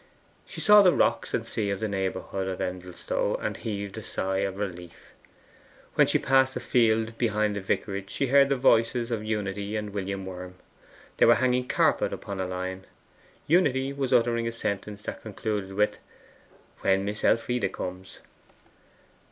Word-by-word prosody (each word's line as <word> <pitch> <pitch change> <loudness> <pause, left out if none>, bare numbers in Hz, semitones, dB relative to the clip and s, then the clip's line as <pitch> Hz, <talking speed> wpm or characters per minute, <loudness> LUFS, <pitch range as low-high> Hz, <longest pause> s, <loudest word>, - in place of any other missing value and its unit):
She - - -7
saw 210 0 +8
the 185 -3 +6
rocks - - +1
and - - -1
sea 105 -3 -2
in 100 - -1
the 110 - -2
neighbourhood 95 -1 -3
of 95 -1 -4
Endelstow, 90 -1 -2
and - - -3
heaved 100 -1 -5
a - - -8
sigh 95 -2 -2
of 95 -1 -2
relief. 90 -4 -7 0.8
When - - +4
she - - +3
passed 130 0 +3
a - - -2
field 115 -2 +2
behind 105 -3 +1
the 100 - -3
vicarage 95 0 -2
she 140 - -1
heard 140 +1 +5
the 140 - +2
voices 120 -1 +2
of 110 -2 -2
Unity 105 -1 -3
and 105 -1 -3
William 100 -1 -4
Worm. 90 -1 -8 0.6
They - - +5
were 120 - +7
hanging 125 0 +1
a - - -19
carpet - - +2
upon 100 -1 -6
a 95 - -2
line. 95 +1 -5 0.6
Unity 140 -5 +2
was 135 -2 -2
uttering 115 0 +2
a - - -1
sentence 105 -2 -4
that - - -6
concluded 105 -2 -4
with 105 +1 +1 0.8
'when 95 0 +2
Miss 105 +1 -4
Elfride 115 -3 +1
comes. 90 +1 -7
105 Hz, 170 wpm, -27 LUFS, 95-120 Hz, 0.8 s, saw